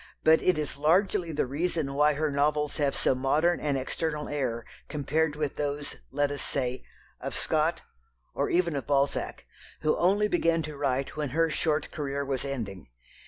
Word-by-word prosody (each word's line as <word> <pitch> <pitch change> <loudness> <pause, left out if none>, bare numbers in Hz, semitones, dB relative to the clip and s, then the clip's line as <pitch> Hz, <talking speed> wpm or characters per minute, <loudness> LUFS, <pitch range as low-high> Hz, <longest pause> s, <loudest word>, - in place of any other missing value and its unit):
But 160 0 +6
it 185 -3 +3
is 150 -2 -2
largely 170 +3 +2
the 150 - 0
reason 150 +1 -1
why 150 +2 +4
her 150 +1 0
novels 150 +1 +1
have 145 -2 +1
so - - +2
modern 150 +7 +2
an 145 -2 0
external 150 +3 -2
air 125 -6 -2 0.2
compared 150 +1 0
with 150 -2 -2
those, 145 0 -2
let 145 0 +1
us 145 - -3
say, 125 -2 -1 0.4
of - - -5
Scott, - - +1 0.5
or - - 0
even 170 -3 +2
of 140 - -3
Balzac, 140 0 0 0.4
who 155 - +2
only 200 +4 +3
began 165 -3 +2
to 155 0 -6
write 135 -1 -1
when 150 -2 -2
her 165 -1 +3
short 155 -1 0
career 140 -2 -3
was 135 -2 -2
ending. 115 -9 -5
150 Hz, 170 wpm, -28 LUFS, 140-160 Hz, 0.5 s, But